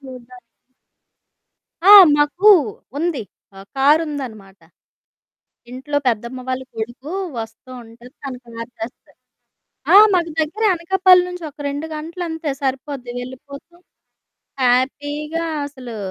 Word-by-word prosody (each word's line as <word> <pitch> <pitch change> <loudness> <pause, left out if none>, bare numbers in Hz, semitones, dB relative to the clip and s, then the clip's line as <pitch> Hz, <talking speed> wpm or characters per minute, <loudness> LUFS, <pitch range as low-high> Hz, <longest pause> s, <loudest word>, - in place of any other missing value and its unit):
చూడడానికి 250 -2 -12 1.4
ఆ! 400 - +7 0.3
మాకూ 320 +8 +4 0.5
ఉంది. 325 -6 -2 0.3
ఆహ్, 195 +1 -13
కారుందనమాట. 270 - 0 1.1
ఇంట్లో 285 +3 -3
పెద్దమ్మ 235 +2 -2
వాళ్ళ 260 0 -2
కొడుకూ 240 +7 -6 0.3
వస్తా 225 +3 -9
ఉంటడు, 235 +2 -15
తను 260 -3 -6
కారు 230 +1 -9
తెస్తాడు. 225 +2 -9 0.7
ఆ! - - +7 0.2
మాకు 340 -2 0
దగ్గరే 415 +9 -1
అనకాపల్లి 365 +1 +4
నుంచి 360 -1 -8
ఒక 290 - -34
2 290 +3 -4
గంటలంతే, 320 -1 -5
సరిపోద్ది, 265 -1 -4
వెళ్ళిపోతాం. 280 +7 -11 0.8
హ్యాపీగా 290 +6 0 0.2
అసలు 255 -5 -9
275 Hz, 100 wpm, -19 LUFS, 245-320 Hz, 1.4 s, ఆ